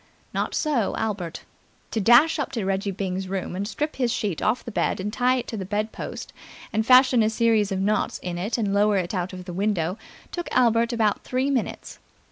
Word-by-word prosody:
Not - - -1
so 280 -10 0
Albert. 195 -7 -3 0.5
To 220 - -1
dash 245 - +6
up 275 -1 -2
to 225 -6 -2
Reggie 195 +1 -1
Byng's 190 -1 -3
room 185 -1 -3
and 200 +2 -2
strip 300 +7 -3
his 245 -3 +1
sheet 210 -8 -2
off 220 +4 0
the 235 - -6
bed - - 0
and 205 +3 -3
tie 250 +2 +2
it 250 - -3
to 225 - -4
the 195 - -3
bed 210 +3 -2
post - - -7 0.4
and 220 +1 +2
fashion 255 0 +6
a 215 - +3
series 220 -2 +2
of 190 - -1
knots 210 +2 0
in 175 -1 -5
it 205 +8 -1
and 205 -4 0
lower 205 0 +3
it 180 0 -2
out 180 -1 -2
of 185 -1 -8
the 180 - -6
window 190 -1 -1 0.3
took 345 -1 -4
Albert 235 -1 +3
about 220 -3 +1
three 260 +2 0
minutes. 255 -5 -3
215 Hz, 215 wpm, -24 LUFS, 195-240 Hz, 0.5 s, dash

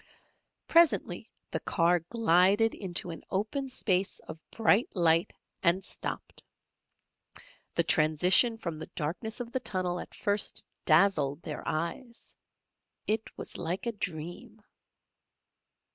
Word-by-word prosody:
Presently 335 -1 +3 0.2
the - - -1
car 175 0 +2
glided 200 +3 +3
into 175 -3 -1
an 165 - -9
open 220 +8 -2
space 195 -6 0
of 160 - -10
bright 225 0 +2
light, 165 -1 +3 0.3
and 185 +2 +3
stopped. - - -5 1.3
The - - +3
transition 180 - +5
from 170 -7 -5
the 160 - -8
darkness 180 +9 -3
of 235 -1 -7
the 260 - -1
tunnel 185 -6 -2
at - - -9
first 205 -1 0 0.2
dazzled 155 -3 +3
their 150 - -5
eyes. 200 +10 -5 0.7
It 220 +1 -1
was - - -6
like 175 +7 -3
a 235 - 0
dream. 195 +4 -5
185 Hz, 115 wpm, -29 LUFS, 165-220 Hz, 1.3 s, transition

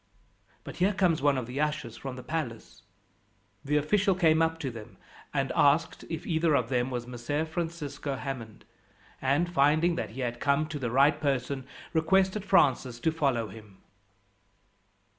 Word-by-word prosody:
But - - -9
here 190 +3 +2
comes 175 -6 +2
one 140 -1 +3
of 130 - -2
the 125 +5 -3
ushers 150 -6 -2
from 135 -2 -6
the 125 - -9
palace." 150 -9 -5 0.8
The 150 +2 +1
official 190 +6 +2
came 165 -3 +4
up 165 0 +1
to 135 - -3
them, 115 0 -11 0.3
and 135 -2 -1
asked 145 +3 +2
if 165 +1 -5
either 160 -2 +2
of 120 - +1
them 125 -1 0
was 120 -2 -4
Messer 125 +5 -3
Francisco 160 -4 -4
Hammond, 130 -5 -7 0.6
and, 140 +6 +2
finding 155 +4 +3
that - - -3
he 125 +5 -7
had 120 -1 -3
come 140 +2 +2
to 150 -1 -4
the 125 -3 -2
right 140 +5 +3
person, 135 -2 -1 0.3
requested 190 +5 +2
Francis 135 - +2
to 160 - +1
follow 135 -8 0
him. 105 -1 -13
145 Hz, 160 wpm, -28 LUFS, 125-160 Hz, 0.8 s, came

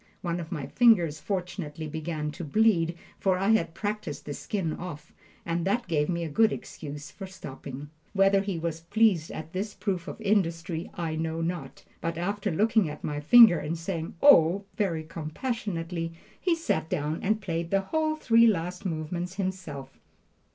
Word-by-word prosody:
One 170 -1 -1
of 165 -2 -7
my 140 - -3
fingers 175 - +4
fortunately 175 -4 -4
began 155 0 -3
to 160 - -7
bleed, 170 -1 +2 0.2
for 190 -2 +2
I 195 +3 +1
had 195 -7 +2
practised 205 -7 -4
the 145 - -4
skin 175 -1 -2
off, 155 -3 -8 0.3
and 170 0 -1
that 235 +4 0
gave 150 -3 +1
me 170 -1 -1
a - - -2
good 220 +9 +3
excuse 145 -1 -7
for 195 - -8
stopping. 145 -6 -8 0.2
Whether 195 0 +4
he 195 -3 -3
was 165 0 -3
pleased 185 -2 +2
at 160 +1 -7
this 200 +3 -3
proof 185 -5 -2
of - - -7
industry, 170 -5 0
I 165 -2 -2
know 160 +1 -2
not; 165 -5 -4 0.2
but 165 -1 -2
after 200 +4 -1
looking 210 +1 +2
at 150 - -8
my 145 -1 -2
finger 195 +3 +8
and 165 +3 -3
saying, 165 -1 -4
"Oh!" 195 - +7
very 170 -7 0
compassionately, 165 0 -4 0.3
he 350 -2 +2
sat 160 - -1
down 155 -2 -1
and 215 +2 +1
played 170 -4 -3
the 195 +1 +2
whole 310 +9 0
three 230 -6 +5
last 180 -1 0
movements 170 +2 -3
himself. 185 -9 -5
170 Hz, 170 wpm, -28 LUFS, 160-200 Hz, 0.3 s, finger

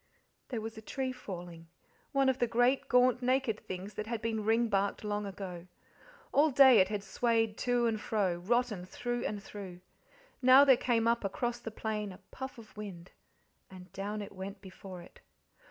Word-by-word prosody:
There 235 -4 -4
was 220 0 -6
a - - -11
tree 260 +4 -3
falling, 175 -8 -8 0.4
one 275 -1 +3
of 265 0 +2
the 240 - +2
great, 245 +4 +2
gaunt, 250 0 +4
naked 255 -3 +1
things 185 +3 -7
that 215 - -5
had 230 -1 -2
been 220 -1 -2
ringbarked 220 -3 +1
long 210 -1 -2
ago. 185 -3 -7 0.6
All 300 +3 +4
day 265 -4 +7
it 185 - +5
had 205 0 -3
swayed 225 -1 +1
to 245 -1 +1
and 220 -2 0
fro, 195 -6 0
rotten 215 +1 0
through 240 +6 -3
and 205 -1 -3
through; 190 -4 -9 0.6
now 260 +2 +8
there 265 -2 +7
came 235 -2 +1
up 235 0 +2
across 240 +5 -2
the 235 - -6
plain 215 -2 -3
a 185 - -11
puff 265 -1 -7
of 220 -2 -14
wind, 195 -4 -8 0.6
and 185 0 -13
down 205 +2 -4
it - - -9
went 195 +1 -7
before 190 -2 -10
it. - - -17
220 Hz, 180 wpm, -32 LUFS, 195-245 Hz, 0.6 s, now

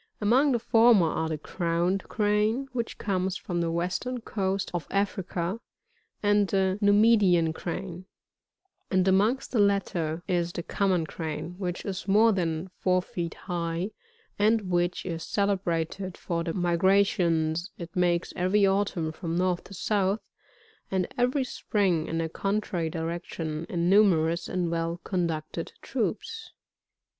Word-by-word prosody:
Among 255 +7 +4
the - - +3
former 230 -4 +5
are 160 0 -1
the 155 - -2
Crowned 175 +4 -1
Crane, 215 +5 +1
which 235 -2 -3
comes 190 -1 -1
from 175 -2 -3
the 170 - 0
western 180 +9 -2
coast 195 -4 -2
of 175 -2 -3
Africa, 190 -1 -1 0.6
and 205 -1 +3
the 190 0 +1
Numidian 205 -5 +4
Crane; 180 +2 -6 0.8
and 185 -1 +2
amongst 205 +7 +2
the 235 - +1
latter 180 -5 +1
is 175 -2 0
the 170 - -4
Common 185 -4 +1
Crane, 155 +1 -5
which 180 -3 -3
is 190 -2 -4
more 215 +3 +5
than 170 -2 -1
four 185 -1 +2
feet 170 -3 -5
high; 175 +1 -2 0.5
and 210 -2 +2
which 175 0 0
is 165 -3 -4
celebrated 185 -1 -1
for 170 -1 -2
the 165 -1 -3
migrations 175 -2 +2
it 170 -1 -9
makes 175 -1 +1
every 195 +3 +3
autumn 190 -5 0
from* 165 +1 -4
north 180 -1 0
to 200 - -10
south, 200 +2 0 0.6
and 190 -1 0
every 250 +3 +1
spring 190 -9 0
in 165 0 -1
a 165 - -1
contrary 195 -2 -2
direction, 165 -1 -4
in! 170 -1 0
numerous 170 -4 +3
and 175 -2 -1
well 165 +1 -2
conducted 165 -5 -3
troops. 455 0 -3
185 Hz, 135 wpm, -27 LUFS, 170-205 Hz, 0.8 s, former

